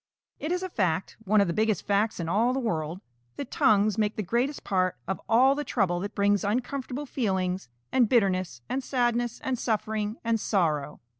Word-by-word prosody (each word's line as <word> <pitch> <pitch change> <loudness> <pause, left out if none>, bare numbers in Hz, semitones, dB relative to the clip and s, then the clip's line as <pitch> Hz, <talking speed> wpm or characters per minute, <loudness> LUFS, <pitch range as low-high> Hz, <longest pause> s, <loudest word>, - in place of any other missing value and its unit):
_ - - -67 0.4
It 310 - -3
is 360 +1 -1
a 375 - -3
fact, 185 - -1
one 210 +1 +4
of 200 - +2
the 170 - -1
biggest 215 +1 0
facts 205 +1 +1
in 165 - -3
all 225 +8 +2
the 265 - 0
world, 170 -6 -2 0.3
that 280 - -6
tongues 210 0 +3
make 210 0 +1
the 215 - -2
greatest 240 - -1
part 185 -5 0
of 190 - -3
all 255 +4 +6
the 295 +1 -3
trouble 190 -10 0
that 200 +3 -5
brings 205 0 +2
uncomfortable 255 +5 -2
feelings, 190 - -1 0.2
and 245 -4 +3
bitterness 185 - +1
and 265 +1 -2
sadness 240 -2 0
and 260 -4 -1
suffering 215 -1 -1
and 230 -1 +1
sorrow. 155 -9 0
215 Hz, 195 wpm, -27 LUFS, 190-245 Hz, 0.4 s, all